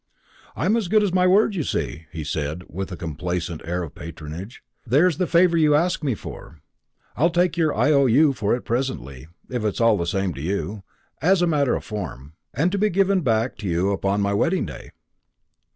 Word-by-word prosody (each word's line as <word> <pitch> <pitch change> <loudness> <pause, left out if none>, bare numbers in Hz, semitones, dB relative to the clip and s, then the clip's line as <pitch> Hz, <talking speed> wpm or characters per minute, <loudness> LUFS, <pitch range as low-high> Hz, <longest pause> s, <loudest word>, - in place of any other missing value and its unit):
"I'm 195 +7 +1
as 225 -5 0
good 215 +3 +3
as 195 -3 0
my 185 0 +4
word, 200 +3 +4
you 180 - -1
see," 80 - -3
he 80 -3 -5
said 75 +3 -3
with 95 +2 -5
a 90 - -5
complacent 85 +1 -4
air 90 +2 -2
of 80 - -8
patronage. 85 - -9 0.2
"There's 145 +7 +3
the 180 - +1
favour 170 0 +4
you 150 -2 +4
asked 170 +2 +1
me 135 -6 0
for; 80 - -10 0.6
I'll 165 +6 +3
take 175 -1 +1
your 160 -3 +1
IOU 140 0 +4
for 110 -3 0
it 125 - -5
presently, 75 - -3 0.2
if 125 -3 -2
it's 105 -2 -1
all 115 -2 +4
the 85 - -2
same 95 0 -1
to 70 - -8
you 100 +4 -3 0.4
as 180 +1 +3
a - - +5
matter 145 -6 +2
of - - -4
form 80 - -7 0.2
and 160 +8 +1
to 200 - -1
be 215 +1 +3
given 195 0 +2
back 115 -3 0
to 105 - -5
you 90 +3 +1
upon 100 +1 0
my 100 0 +1
wedding 165 - +1
day." - - -9
115 Hz, 200 wpm, -23 LUFS, -, 0.6 s, a